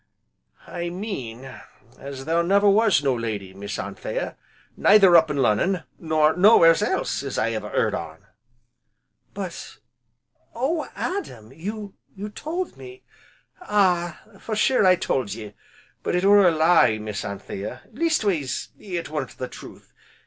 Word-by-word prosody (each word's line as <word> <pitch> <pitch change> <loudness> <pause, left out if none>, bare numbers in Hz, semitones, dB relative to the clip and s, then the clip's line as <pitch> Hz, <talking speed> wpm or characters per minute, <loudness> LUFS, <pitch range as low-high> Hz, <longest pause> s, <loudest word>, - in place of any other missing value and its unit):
"I 175 0 -5
mean 135 - -6 0.5
as 135 -1 -8
there 165 +2 +2
never 200 +4 +3
was 205 -6 +4
no 135 -2 +2
lady, 110 -5 -4
Miss 100 +1 -6
Anthea, - - -5 0.4
neither 195 -4 +6
up 160 -1 +7
to 150 - -3
Lonnon, 150 - +1 0.2
nor 155 -1 +2
nowhere's 180 -3 +6
else, - - -1
as 140 -1 -5
I 115 +1 +1
ever 110 - -4
heard - - 0
on." - - -6 1.1
"But - - -7 0.8
oh 285 +5 -1
Adam! 125 - -5
you 205 +5 -6 0.4
told 345 - -4
me 385 0 -12 0.3
" - - -38
"Ah! 180 - +1 0.2
for 220 - -4
sure 215 -1 +3
I 185 - +6
told 125 - -2
ye, 105 -2 -9 0.5
but - - -1
it 180 +2 +1
were 200 -1 +6
a - - +5
lie, 160 -8 +4
Miss 105 -1 -5
Anthea, 100 0 -6
leastways, 215 - -1
it 175 -6 -5
weren't 150 -4 -5
the 130 - -4
truth. - - -13
170 Hz, 140 wpm, -23 LUFS, 130-205 Hz, 1.1 s, up